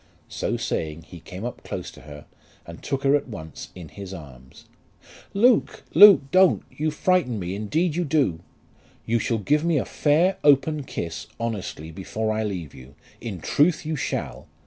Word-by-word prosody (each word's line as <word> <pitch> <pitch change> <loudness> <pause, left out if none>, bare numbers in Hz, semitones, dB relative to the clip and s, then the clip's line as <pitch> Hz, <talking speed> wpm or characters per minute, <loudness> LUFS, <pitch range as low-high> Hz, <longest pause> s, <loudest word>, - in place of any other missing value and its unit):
So - - -2
saying 80 0 -3
he 85 +3 -12
came 90 +6 -8
up 120 - -6
close - - -6
to - - -15
her, 75 -1 -11 0.4
and 85 0 -10
took 135 -1 -3
her 140 +1 +4
at 145 - -1
once 80 -9 -8
in 85 -4 -9
his 95 +3 -8
arms. 65 -6 -13 0.7
"Luke, 235 +3 +3
Luke; 200 -7 +9
don't. 185 -1 +5
You 155 +1 -1
frighten 155 -6 +1
me; 90 -2 -4
indeed 150 - -1
you 175 - 0
do." 140 - +1 0.7
"You 115 +1 +1
shall 115 +1 0
give 150 +9 +1
me 170 -2 +2
a - - 0
fair 165 +6 +2
open 145 +1 +3
kiss, 85 -7 -5
honestly, 100 -8 -4
before 110 +5 -3
I 110 - -1
leave 90 -8 -4
you, 65 +2 -14 0.3
in 100 -8 -6
truth 155 - +2
you 160 0 -2
shall. 135 - -4
115 Hz, 170 wpm, -24 LUFS, -, 0.7 s, Luke